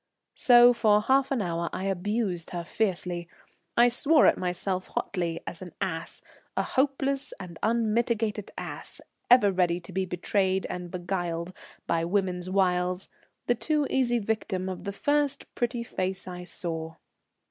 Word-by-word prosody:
So 245 -1 +7
for 215 -3 +4
half 265 +5 +3
an 255 -6 0
hour 170 -1 -2
I - - -4
abused 195 -1 -1
her 175 -1 -4
fiercely; 175 -3 -1 0.5
I 240 +1 +7
swore 290 +6 +4
at - - +6
myself 185 +1 -2
hotly 170 -2 -2
as 170 - -7
an 180 -3 -9
ass, 170 -5 -4 0.3
a - - +3
hopeless 275 0 0
and 170 -3 -9
unmitigated 225 -1 0
ass, - - -7 0.3
ever 240 -5 +7
ready 180 -2 +1
to 175 - -11
be 190 +1 -1
betrayed 190 +1 0
and 180 -1 -5
beguiled 175 -1 -3 0.3
by 165 0 +1
woman's 180 0 -1
wiles, 180 -1 +1 0.4
the 245 - +3
too 300 +5 0
easy 245 -2 +2
victim 200 -4 -2
of 185 +1 -6
the 200 - -2
first 290 +6 +1
pretty 240 0 -1
face 190 -5 -3
I 180 -1 -7
saw. 165 -1 -5
190 Hz, 145 wpm, -27 LUFS, 180-235 Hz, 0.5 s, So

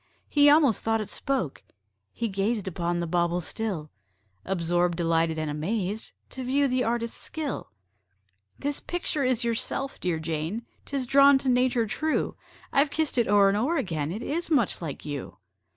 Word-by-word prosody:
He 290 -1 +5
almost 290 -6 +5
thought 225 0 +1
it 215 - -4
spoke: 260 - -2 0.5
he 235 - -2
gazed 200 +1 -1
Upon 175 -1 -1
the - - -1
bauble 175 +1 +1
still, 180 -4 -4 0.5
Absorbed, 175 -1 +1
delighted, 165 -1 +1
and 155 0 -2
amazed, 190 +7 -2 0.2
To 260 - -6
view 275 +3 +2
the 255 -1 +1
artist's 230 0 -2
skill. 310 -3 -4 0.9
"This 285 0 -1
picture 345 -4 -2
is 255 -2 +1
yourself, 235 +4 -1
dear 175 -3 0
Jane 160 +8 -3 0.2
'Tis 275 -2 -2
drawn 275 +2 +7
to 265 0 -1
nature 250 -2 +3
true: 310 +8 -1 0.4
I've 280 +1 +4
kissed 305 -3 0
it 235 - +2
o'er 200 -1 +5
and 195 - +1
o'er 285 +10 +1
again, 160 - -2
It 215 +6 -5
is 335 +4 -2
much 270 - +2
like 155 -4 -6
you." 145 -3 -5
225 Hz, 165 wpm, -27 LUFS, 175-270 Hz, 0.9 s, drawn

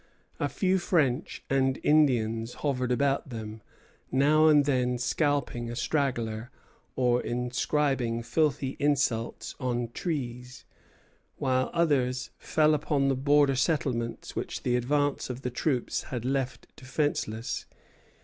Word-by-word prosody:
A - - 0
few 190 -1 +1
French 150 -8 0
and 135 -1 +1
Indians 120 -6 +2
hovered 130 -3 0
about 135 +2 +1
them, 110 -2 -7 0.5
now 150 +4 +4
and 150 -2 +6
then 125 -3 +1
scalping 125 -2 0
a 120 - -5
straggler 120 -4 -1 0.5
or 125 -1 +2
inscribing 125 0 0
filthy 135 +1 0
insults 135 -6 0
on 120 -2 -1
trees; 125 -4 -5 0.7
while 130 0 +1
others 135 -7 +1
fell 155 0 +3
upon 145 -2 +1
the 135 - +2
border 140 +1 +3
settlements 125 -5 -1
which - - -4
the 125 -1 +1
advance 145 +4 0
of 125 +1 -6
the 125 - -2
troops 125 0 -1
had 120 -2 -5
left 130 -2 -2
defenceless. 130 -4 -2
130 Hz, 120 wpm, -28 LUFS, 120-145 Hz, 0.7 s, and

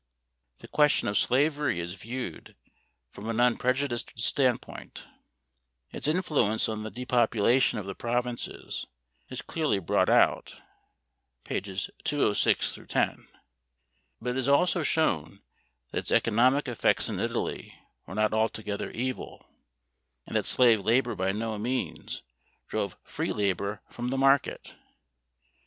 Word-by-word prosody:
The - - -12
question 150 -1 +3
of 100 - -1
slavery 145 - +2
is 85 +1 -4
viewed 115 -1 -6 0.6
from 105 +3 -7
an 115 0 -1
unprejudiced 125 0 +1
standpoint. 125 +2 -1 0.9
Its - - -3
influence 150 - +1
on 110 -1 -3
the 110 - -5
depopulation 120 +1 +2
of 105 - -4
the 100 - -4
provinces 120 +2 -3 0.4
is 130 - -6
clearly 155 -9 0
brought 95 - +1
out - - +3 0.9
(pp. 95 -1 -3
206 140 -8 +2
10), - - 0 0.9
but 125 - -2
it 125 - -3
is 130 0 -1
also 165 +4 +4
shown 100 - 0 0.5
that - - -1
its - - -6
economic 125 +6 +3
effects 120 -3 +2
in - - -3
Italy - - -3 0.3
were 95 - -7
not 110 0 +2
altogether 110 -2 -1
evil, 130 +2 -4 0.8
and - - -8
that - - +2
slave 115 -5 +5
labor 120 +3 +2
by 95 +1 0
no 110 +1 -3
means 105 -9 -3 0.4
drove - - -3
free - - -3
labor 100 0 -1
from 120 0 -4
the 135 +2 -1
market 135 0 +3
(pp. - - -13
120 Hz, 125 wpm, -28 LUFS, 105-130 Hz, 0.9 s, slave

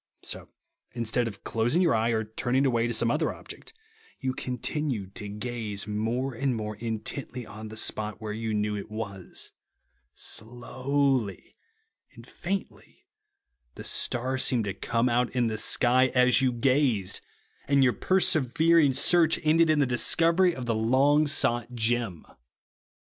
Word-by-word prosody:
So, - - -3 0.4
instead 120 0 -1
of 100 -3 -9
closing 120 +9 0
your 180 -3 +3
eye 115 +1 +1
or 110 -1 0
turning 120 +5 -1
away 120 -3 +1
to 120 - -1
some 115 +1 +3
other 155 +3 0
object, - - -11 0.5
you 130 -2 -2
continued 125 -5 -3
to 105 - -6
gaze 105 -1 -4
more 115 +5 -2
and 130 +1 -1
more 105 -1 -4
intently 120 +3 -5
on 110 +1 -9
the 110 +1 -8
spot 105 -1 0
w^here 105 -1 -5
you 110 -1 -2
knew 105 0 -1
it 100 - -6
was. 100 -4 -6 0.6
Slowly 125 -1 -2 0.6
and - - -14
faintly 195 +2 -6 0.7
the - - -8
star 130 +2 -1
seemed 120 -4 +1
to 100 - -2
come 115 +5 0
out 120 0 +1
in 125 -1 +2
the 110 -1 -2
sky, 125 +3 +3
as 125 +1 +5
you 130 -1 +2
gazed; 125 -5 +1 0.5
and 140 0 +4
your 125 -2 +4
persever 165 -2 +3
ing 140 -4 +3
search 165 0 +4
ended 160 +1 +4
in 155 - +3
the 145 - +3
discovery 165 +8 +3
of 130 - -6
the 115 - 0
long 135 +7 +3
sought 125 -4 0
gem. 115 -6 -1
120 Hz, 150 wpm, -27 LUFS, 110-135 Hz, 0.7 s, as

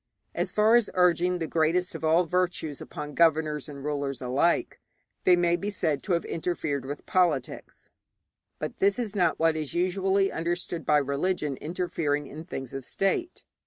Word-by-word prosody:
As - - -2
far 215 +2 +4
as 235 -4 +1
urging 180 0 +3
the 165 - -2
greatest 170 +4 +1
of 165 - -7
all 160 +3 +4
virtues 175 -4 -1
upon 150 0 -7
governors 155 -3 +2
and 140 -2 -9
rulers 140 -2 -2
alike, 135 +7 0 0.5
they 180 - +7
may 175 -1 +2
be 200 +4 -3
said 155 -8 -1
to 190 - -1
have 170 - 0
interfered 155 -5 -2
with 145 +2 -6
politics; 170 -8 -1 0.7
but - - -5
this 200 +1 +3
is 225 -4 -3
not 175 -5 +2
what 165 0 +2
is 155 -1 -4
usually 190 +2 +1
understood 170 0 -3
by 150 - +5
religion 145 +1 -1
interfering 155 -3 -2
in 155 +3 -9
things 135 -8 -6
of 135 0 -5
state. 195 - -1
165 Hz, 165 wpm, -27 LUFS, 150-180 Hz, 0.7 s, they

